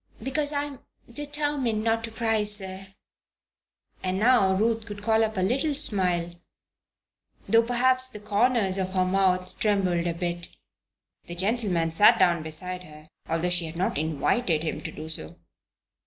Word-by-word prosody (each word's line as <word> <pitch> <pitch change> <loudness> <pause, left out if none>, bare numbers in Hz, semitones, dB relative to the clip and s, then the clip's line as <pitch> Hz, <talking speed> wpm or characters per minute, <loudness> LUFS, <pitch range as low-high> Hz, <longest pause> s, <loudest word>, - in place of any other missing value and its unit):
"Because 290 +3 -1
I 285 -1 -1
am 285 -3 -8 0.3
determined 290 -5 0
not 225 0 0
to - - -8
cry, 225 -1 0
sir," 195 -2 +3 1.1
and 185 0 -2
now 215 -3 +4
Ruth 225 +2 0
could 205 -1 -8
call 225 +1 +3
up 220 -2 -2
a - - +1
little 270 +10 0
smile, 180 - -1 1.1
though 230 - +5
perhaps 255 +2 +2
the 210 - -8
corners 210 -1 +1
of 185 0 -3
her 185 -1 +1
mouth 185 -1 +1
trembled 185 -5 +1
a 170 - -2
bit. 175 0 -4 0.8
The 175 - -7
gentleman 190 -4 0
sat 185 +6 +5
down 170 -2 +3
beside 180 +4 -2
her, 155 0 -15 0.2
although 165 +2 0
she 175 -1 +1
had 160 +1 -8
not 185 - -1
invited 160 - 0
him 160 - -4
to - - -6
do 155 - -9
so. 115 - -4
195 Hz, 155 wpm, -26 LUFS, 175-230 Hz, 1.1 s, though